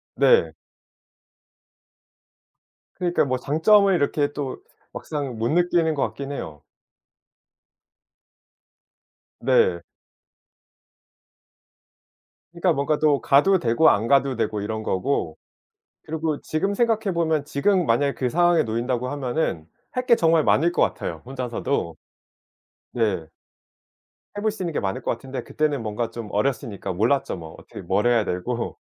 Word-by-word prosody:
네. 470 -1 +4 2.5
그러니까 175 -1 +1
뭐 130 -1 -1
장점을 195 - +4
이렇게 145 -2 0
또 140 -3 -5 0.3
막상 140 -6 -5
못 115 +2 -1
느끼는 170 -1 +2
것 140 - 0
같긴 140 0 -4
해요. 75 - -7 2.8
네. 115 -8 +3 2.7
그러니까 175 0 +1
뭔가 145 +2 0
또 150 -3 +2
가도 185 +8 +4
되고 120 +5 +4
안 110 +3 +1
가도 135 0 +3
되고 110 -2 -2
이런 110 +1 -3
거고 110 +9 -1 0.7
그리고 155 -1 -3
지금 195 +6 -1
생각해 220 -3 +1
보면 160 -3 0
지금 175 +5 +1
만약에 140 +5 +2
그 125 -2 -2
상황에 175 +1 +3
놓인다고 120 +3 -2
하면은 130 - -2 0.2
할 250 0 -3
게 235 - +6
정말 165 -6 +3
많을 165 +4 +3
것 - - +1
같아요 - - -2
혼자서도. 125 - -3 1.0
네. 105 -9 -1 1.1
해 - - -3
볼 215 0 +1
수 210 -2 -9
있는 170 -3 -3
게 - - 0
많을 95 -1 -3
것 - - -1
같은데 130 +3 -6
그때는 150 -4 -1
뭔가 110 +1 -3
좀 115 -3 -7
어렸으니까 105 -4 -2
몰랐죠 115 +8 +1
뭐 80 -1 -10
어떻게 - - -11
뭘 95 +5 0
해야 120 -3 +3
되고. 115 +7 -3
140 Hz, 250 characters per minute, -23 LUFS, 115-165 Hz, 2.8 s, 게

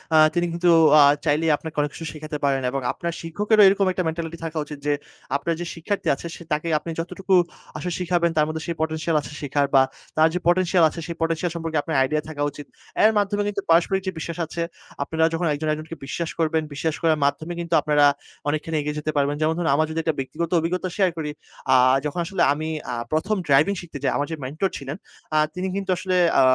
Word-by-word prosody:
আ - - +7 0.2
তিনি 175 0 +1
কিন্তু 175 +1 +2 0.3
আ - - +9 0.2
চাইলেই 155 +1 +2
আপনাকে 160 -1 -8
অনেক 145 0 -1
কিছু 165 - -7
শিখাতে 155 0 -6
পারেন 135 -1 +2
এবং 135 -1 -2
আপনার 170 -1 -4
শিক্ষকেরও 210 +6 +2
এরকম 195 0 +3
একটা 185 0 -1
মেন্টালিটি 165 0 -4
থাকা 160 0 -5
উচিত 150 -1 -8
যে, 145 - +3 0.4
আপনার 165 +4 0
যে 175 - -3
শিক্ষার্থী 190 +2 -3
আছে, 170 - -8
সে 170 - -11
তাকে 155 +3 -1
আপনি 165 - -8
যতটুকু 185 +3 -2 0.4
আসলে 180 -1 -3
শিখাবেন 175 -1 +1
তার 150 - +5
মধ্যে 155 0 -4
সেই 170 - -2
পটেনশিয়াল 160 0 -1
আছে 140 - -9
শিখার 145 0 +1
বা 135 - +8 0.4
তার 160 +1 +6
যে 180 - 0
পটেনশিয়াল 175 -1 +3
আছে, 170 - -8
সেই 170 - -5
পটেনশিয়াল 165 +1 0
সম্পর্কে 165 -2 -2
আপনার 160 - -3
আইডিয়া 150 +3 0
থাকা 145 -2 -6
উচিত। 145 +1 -10 0.4
এর 220 - +7
মাধ্যমে 205 0 +1
কিন্তু 200 -1 -2
পারস্পরিক 175 +4 +3
যে - - +1
বিশ্বাস 170 +1 -5
আছে, 170 +2 -5 0.4
আপনারা 160 +2 +1
যখন 165 0 0
একজন, 155 +2 -3
একজনকে 155 +2 -6
বিশ্বাস 165 +4 -3
করবেন। 160 0 +1
বিশ্বাস 155 +2 -1
করার 160 -2 +2
মাধ্যমে 155 +4 -1
কিন্তু 170 -1 -4
আপনারা 150 -1 +4 0.4
অনেকখানি 155 +2 -2
এগিয়ে 150 +1 -3
যেতে 155 +1 -2
পারবেন। 145 +1 +2
যেমন 155 +1 +2
ধরুন, 170 -4 0
আমার 155 0 +2
যদি 165 - -1 0.2
ব্যক্তি 135 +3 -6 0.2
অভিজ্ঞতা 180 +2 -2
শেয়ার 190 -3 +3
করি। 150 -2 -3 0.4
আ - - +7 0.3
যখন 150 +4 -2
আসলে 190 0 -2
আমি 155 +2 -4 0.2
আ - - -2 0.2
১ম 195 +7 +1
ড্রাইভিং 145 +8 +4
শিখতে 165 -4 -9
যাই, - - +2
আমার 145 - -1
যে - - -1
মেন্টর 155 +8 -1
ছিলেন, 140 +2 -6 0.4
আ - - +4 0.2
তিনি 185 +1 -3
কিন্তু 195 -1 -4
আসলে 185 0 -1 0.2
আ - - +7
160 Hz, 215 wpm, -23 LUFS, 150-175 Hz, 0.4 s, আ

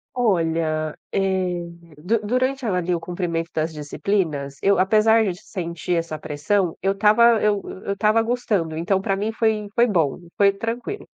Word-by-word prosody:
Olha, 165 -8 0 0.2
eh, 185 -2 0 0.3
du 185 +10 0
durante, 255 +3 0
ali, 180 -3 0
o 170 - -2
cumprimento 170 -2 -3
das 160 +1 -1
disciplinas 150 -2 -2
eu 200 0 +3
apesar 215 +4 +4
de 180 -2 -3
sentir 175 -3 -4
essa 165 -2 -3
pressão, 160 +5 -1
eu 195 +1 +2
estava 215 +3 +4
eu 205 -1 +2 0.2
eu 200 - 0
estava 215 +3 +2
gostando, 210 -9 -1
então 180 +4 0
pra 195 0 -1
mim 210 +3 -1
foi 220 -2 0
foi 240 0 +4
bom, 165 - +1 0.2
foi 200 -1 +5
tranquilo. 230 - -5
195 Hz, 155 wpm, -22 LUFS, 165-215 Hz, 0.3 s, foi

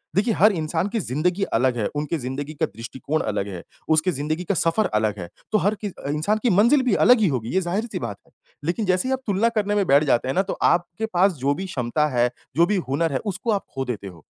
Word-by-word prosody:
देखिए, 215 +4 +2
हर 210 +2 +5
इंसान 165 +1 -1
की 225 - +1
ज़िंदगी 175 +6 -1
अलग 125 0 +1
है, 105 - 0
उनकी 150 +3 -1
ज़िंदगी 140 +3 -5
का 160 +1 0
दृष्टिकोण 130 +5 -4
अलग 105 -1 -2
है, 90 -3 -7 0.3
उसकी 160 +3 +3
ज़िंदगी 155 +4 -2
का 190 - -1
सफ़र 170 +6 +2
अलग 105 -1 +1
है, 85 -1 -6 0.2
तो 215 - +4
हर 210 +1 +1
कि 205 - -1 0.2
इंसान 155 +9 0
की 245 - +3
मंज़िल 230 +9 +5
भी 250 - +1
अलग 250 -1 +7
ही 210 - +3
होगी, 125 -6 -2
ये 190 - +2
ज़ाहिर-सी 200 +7 -2
बात 110 -5 -5
है, - - -26 0.3
लेकिन 180 +6 -1
जैसे 185 +5 +1
ही 265 - +1
आप 260 - -1
तुलना 210 +3 +2
करने 205 -1 +1
में 200 -2 +2
बैठ 140 +2 +5
जाते 130 -4 +1
हैं 130 - -1
ना, 190 - +4
तो 195 - -4
आपके 175 +4 +1
पास 185 +2 +4
जो 140 +2 +1
भी 190 - -5
क्षमता 150 -2 0
है, 125 -1 +2 0.3
जो 170 +3 +5
भी 210 +4 0
हुनर 160 +3 +1
है, 135 - 0
उसको 205 +3 -2
आप 200 -2 -1
खो 135 0 -2
देते 110 -5 -5
हो। 85 -5 -12
165 Hz, 250 wpm, -23 LUFS, 130-200 Hz, 0.3 s, अलग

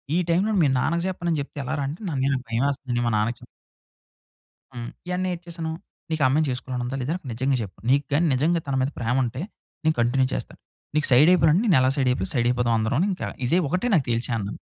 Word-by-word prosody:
ఈ - - +3
టైమ్‌లోని 195 +4 +2
మీ - - +4
నాన్నకి 170 +6 0
జెప్పను 175 -2 -3
అని 155 - 0
జెప్తే 145 - -10
ఎలా 130 +4 -3
రా - - -1
అంటే 150 +5 -6 0.2
"అన్నయ్య 135 +1 +1
నాకు 130 -1 -5
భయమేస్తుంది 130 0 -1
మా - - +1
నాన్నకి 115 +3 0
చెప్" - - -13 1.3
హ్మ్. 120 -1 -6 0.3
ఎంటనే 185 0 -1
ఏటి 175 0 -8
చేసాను, 165 -1 -4 0.4
నీకు 160 -2 -1
ఆ - - +6
అమ్మాయిని 150 +3 +2
జేసుకోవాలని 125 0 -3
ఉందా 130 +2 -3
లేదా? 150 +7 -1 0.2
నిజంగా 130 +4 0
చెప్పు 100 -4 -8
నీకు 140 +2 +3
గాని 165 +4 +3
నిజంగా 160 +6 +2
తన 140 - -1
మీద 130 - +1
ప్రేమ 120 +2 0
ఉంటే 125 +4 -3 0.4
నేను 155 0 +2
కంటిన్యూ 130 +2 +2
చేస్తాను. - - -5 0.4
నీకు 150 - +2
సైడ్ 145 +7 +7
అయిపోయినండి 165 0 +4
నేను 180 - +5
ఎలా 130 - +3
సైడ్ 135 -3 +1
అయిపోయా 95 -6 -1
సైడ్ 120 -2 +2
అయిపోదాం 120 -1 +1
అందరం 110 +2 0
అని 195 - +2
ఇంకా 185 - -3 0.2
ఇదే 165 +8 +2
ఒకటే 185 - 0
నాకు 150 -7 +3
తెలిచేన్నాను. 115 -3 -2
135 Hz, 220 wpm, -24 LUFS, 125-165 Hz, 1.3 s, సైడ్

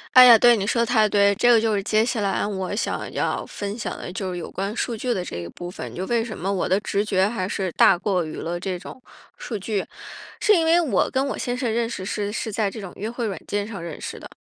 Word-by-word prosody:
哎 255 0 +11
呀， 235 -2 +9
对， 240 +1 +6
你 195 - -2
说 235 +3 +1
的 235 - +2
太 220 -3 +3
对。 200 0 +4
这 240 +5 +3
个 235 -2 +6
就 220 -1 +1
是 200 - 0
接 215 +1 +2
下 235 -2 -1
来 200 -1 0
我 190 -3 -3
想 225 - -3
要 - - -1
分 205 0 -5
享 230 - -5
的 180 - -7
就 190 -1 -4
是 180 - -4
有 170 - -6
关 195 +3 -4
数 235 - -2
据 245 +3 -1
的 180 -4 -2
这 85 - -6
一 85 0 -6
部 175 - -8
分， 180 - -7
就 185 +2 -4
为 235 -1 +1
什 220 - -7
么 190 +3 -2
我 190 - -1
的 190 - +3
直 200 0 0
觉 195 -2 +2
还 210 -5 -3
是 190 -3 -2
大 180 - +5
过 180 -2 0
于 155 - -7
了 175 +1 -3
这 185 0 -3
种 255 +8 -11 0.4
数 220 - -5
据。 200 0 -2 0.6
是 425 - +4
因 335 -4 +3
为 335 +2 +5
我 315 - +1
跟 265 +1 0
我 275 - -3
先 245 0 -3
生 250 -3 -1
认 230 0 0
识 190 -5 -5
是， 205 0 -2
是 220 0 -4
在 205 -1 0
这 220 - -8
种 190 -3 -8
约 215 +3 -5
会 240 -1 -3
软 200 -3 -3
件 205 0 -1
上 205 -5 -7
认 170 -2 -7
识 - - -6
的。 - - -12
205 Hz, 300 characters per minute, -23 LUFS, 190-235 Hz, 0.6 s, 哎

